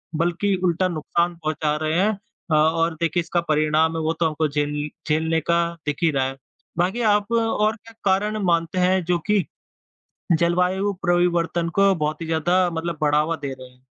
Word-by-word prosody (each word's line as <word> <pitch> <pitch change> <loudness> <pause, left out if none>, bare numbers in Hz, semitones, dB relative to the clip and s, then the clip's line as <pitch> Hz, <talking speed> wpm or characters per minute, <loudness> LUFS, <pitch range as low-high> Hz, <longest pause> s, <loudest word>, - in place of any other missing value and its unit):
बल्कि 175 +5 0
उल्टा 180 +1 +2
नुकसान 170 +1 -1
पहुँचा 155 -1 -1
रहे 155 +2 0
हैं 200 +3 +3 0.4
अ, - - +3
और 165 +2 +2
देखिए 170 +1 +1
इसका 170 +1 -1
परिणाम 155 0 +1
है - - -2
वो 160 +1 +1
तो 170 - +2
हमको 155 0 0
झेल 145 0 -2 0.2
झेलने 160 +1 +1
का 170 +2 +2 0.2
दिख 145 -1 -2
ही 165 - +4
रहा 135 -2 0
है। 135 0 -5 0.4
बाकी 185 +7 0
आप 210 +2 -2
और 225 -2 +1
क्या 225 0 -17
कारण 205 +2 +1
मानते 170 0 +1
हैं 185 +1 +2
जो 175 +1 +1
कि 210 -3 +2 0.9
जलवायु 180 +4 +1
परिवर्तन 175 -1 +1
को 195 0 +5
बहुत 150 -2 -2
ही - - -4
ज़्यादा 175 +3 +2
मतलब 165 -1 -4
बढ़ावा 150 +2 +2
दे 140 -3 -5
रहे 130 -1 -10
हैं? 125 0 -25
170 Hz, 180 wpm, -22 LUFS, 155-180 Hz, 0.9 s, को